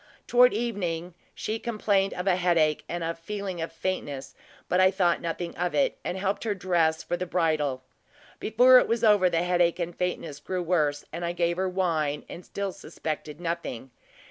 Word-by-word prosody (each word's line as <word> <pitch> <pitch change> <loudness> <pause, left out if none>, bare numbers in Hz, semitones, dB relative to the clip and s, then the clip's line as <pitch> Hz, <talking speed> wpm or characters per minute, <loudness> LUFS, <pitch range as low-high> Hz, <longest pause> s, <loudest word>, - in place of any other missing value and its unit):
Toward 250 +1 +6
evening 180 -7 -2 0.2
she 220 +1 -3
complained 205 -4 +1
of 180 - -4
a 190 -2 +4
headache 170 -4 +2
and 175 0 -3
a 165 0 -1
feeling 185 +1 -5
of 165 - -4
faintness; 145 -7 -4 0.3
but 180 - +2
I 185 0 +6
thought 185 -3 +1
nothing 170 +1 -4
of 180 0 -1
it, 275 -2 +1
and 180 - -3
helped 195 +1 -1
her 215 -3 -1
to - - -16
dress 165 -3 +1
for - - -2
the 180 +1 -4
bridal. 155 -7 0 0.6
Before 250 +4 +6
it - - 0
was 230 0 0
over, 205 -4 +5
the 170 0 +1
headache 175 -1 +2
and 175 -1 -3
faintness 165 -5 -3
grew 180 +3 -3
worse, 150 -4 +1
and 170 +2 -4
I 170 0 -1
gave 170 0 0
her 190 0 0
wine, 160 -6 -1
and 175 - -9
still 200 +1 -4
suspected 155 -5 -6
nothing. 165 -7 -4
175 Hz, 190 wpm, -27 LUFS, 165-195 Hz, 0.6 s, Toward